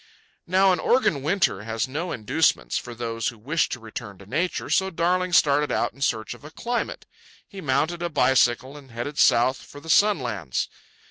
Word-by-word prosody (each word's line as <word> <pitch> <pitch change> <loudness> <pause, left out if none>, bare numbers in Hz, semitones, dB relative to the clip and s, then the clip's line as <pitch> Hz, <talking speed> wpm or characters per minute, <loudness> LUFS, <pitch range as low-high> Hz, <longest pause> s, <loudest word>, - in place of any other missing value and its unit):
Now 190 +1 +4
an 180 - -1
Oregon 200 - +2
winter 155 - +1
has 115 +2 -2
no 160 +7 -4
inducements 125 +8 +1
for 120 -1 -4
those 115 -1 -3
who 120 - -4
wish 150 +9 0
to 120 - -5
return 110 -3 -8
to 100 - -14
Nature, 160 - -2
so 190 0 +2
Darling 180 +1 0
started 150 -4 +3
out - - 0
in 135 - -18
search 110 -4 -1
of 120 - -16
a 150 - -9
climate. 240 +9 -3 0.4
He 195 -2 -9
mounted 155 +5 0
a 175 - -1
bicycle 130 -2 +2
and 140 -2 -14
headed 120 +6 -5
south 130 +1 +4
for 145 - -13
the 160 +2 -4
sunlands. 120 - +1
140 Hz, 185 wpm, -24 LUFS, 120-175 Hz, 0.4 s, Now